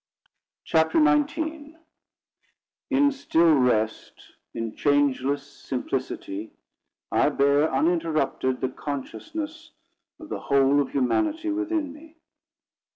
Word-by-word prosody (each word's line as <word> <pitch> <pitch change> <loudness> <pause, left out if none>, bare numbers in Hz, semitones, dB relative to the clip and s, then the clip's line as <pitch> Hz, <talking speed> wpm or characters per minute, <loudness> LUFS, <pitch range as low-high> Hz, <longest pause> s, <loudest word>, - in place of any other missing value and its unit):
CHAPTER 160 0 +2
XIX 290 - +1 1.1
"In 285 +1 +4
still 170 - +3
rest, 120 -5 0 0.2
in 115 -1 -5
changeless 145 -1 +1
simplicity, 130 -6 -5 0.6
I - - +3
bear, 140 +2 +2
uninterrupted, 155 -6 0
the 130 - 0
consciousness 315 - -6 0.5
of 315 - -11
the - - -4
whole 140 +1 +3
of 140 - -3
Humanity 315 - 0
within 320 -3 -2
me." 315 +2 -16
150 Hz, 95 wpm, -25 LUFS, -, 1.1 s, In